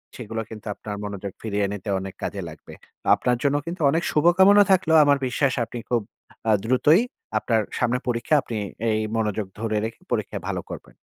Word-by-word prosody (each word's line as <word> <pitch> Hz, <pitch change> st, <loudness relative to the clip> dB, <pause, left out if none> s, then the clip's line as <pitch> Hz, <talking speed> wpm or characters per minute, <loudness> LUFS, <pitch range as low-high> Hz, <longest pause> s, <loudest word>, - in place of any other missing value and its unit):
সেগুলো 115 Hz, -2 st, -5 dB
কিন্তু 110 Hz, -2 st, -10 dB
আপনার 105 Hz, -1 st, -6 dB
মনোযোগ 100 Hz, -1 st, -5 dB
ফিরিয়ে 105 Hz, -2 st, -1 dB
নিতে 105 Hz, 0 st, -6 dB
অনেক 95 Hz, 0 st, -6 dB
কাজে -, -, -3 dB
লাগবে। -, -, -12 dB, 0.3 s
তা -, -, -10 dB
আপনার 125 Hz, -1 st, 0 dB
জন্য 140 Hz, 0 st, +2 dB
কিন্তু 170 Hz, +1 st, -5 dB
অনেক 165 Hz, +3 st, 0 dB
শুভকামনা 190 Hz, +6 st, +6 dB
থাকলো। 175 Hz, -4 st, +3 dB
আমার 145 Hz, -1 st, +4 dB
বিশ্বাস 130 Hz, +1 st, +1 dB
আপনি 120 Hz, +1 st, -7 dB
খুব 120 Hz, -2 st, +2 dB, 0.5 s
আ -, -, +5 dB
দ্রুতই 145 Hz, -, +4 dB, 0.4 s
আপনার 115 Hz, 0 st, +1 dB, 0.2 s
সামনে 125 Hz, 0 st, +1 dB
পরীক্ষা, 120 Hz, +4 st, +1 dB
আপনি 115 Hz, -, -5 dB, 0.3 s
এই 110 Hz, -, +1 dB, 0.2 s
মনোযোগ 105 Hz, -2 st, -1 dB
ধরে 110 Hz, -1 st, -1 dB
রেখে 110 Hz, -, -7 dB
পরীক্ষায় -, -, -2 dB
ভালো -, -, -2 dB
করবেন। -, -, -9 dB
120 Hz, 180 wpm, -24 LUFS, 110-145 Hz, 0.5 s, শুভকামনা